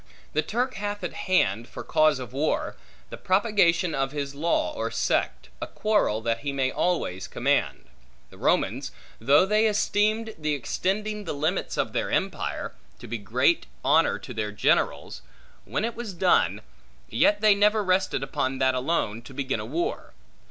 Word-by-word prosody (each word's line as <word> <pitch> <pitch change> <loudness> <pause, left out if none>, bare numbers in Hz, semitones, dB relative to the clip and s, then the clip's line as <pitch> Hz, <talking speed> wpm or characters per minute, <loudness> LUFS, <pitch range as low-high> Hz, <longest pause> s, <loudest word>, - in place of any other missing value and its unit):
The 155 - +2
Turk 245 +8 -1
hath 205 0 -4
at 180 - -3
hand, 120 - +1
for - - -8
cause 155 -2 +3
of 125 -2 -8
war, 145 +4 -1 0.4
the - - -6
propagation 185 -4 +2
of 135 0 -1
his 140 -1 -3
law 160 +4 0
or - - -3
sect; - - -1
a - - -3
quarrel 205 - +1
that 115 0 -1
he 140 +2 -3
may 135 -1 0
always 160 - -1
command. - - 0 0.5
The - - -15
Romans, - - 0 0.3
though 140 +9 +5
they 215 +3 +3
esteemed 215 +1 +1
the 150 -1 0
extending 210 - -2
the 165 - -3
limits 155 +6 -1
of - - -1
their - - -1
empire, - - -2 0.2
to - - -12
be 115 +1 -4
great 100 -10 +1 0.2
honor - - +4
to - - -9
their 105 -2 -3
generals, 100 -8 0 0.4
when 125 - -2
it 235 - -3
was 225 -5 -6
done, 180 +1 +2 0.5
yet 305 +2 +3
they 215 -1 +6
never 210 +1 +3
rested 185 -7 +1
upon 135 0 -2
that 130 0 +2
alone, 125 -5 -1
to 130 +2 -13
begin 130 -4 -2
a 105 - -5
war. 165 +7 -3
165 Hz, 165 wpm, -26 LUFS, 130-205 Hz, 0.5 s, they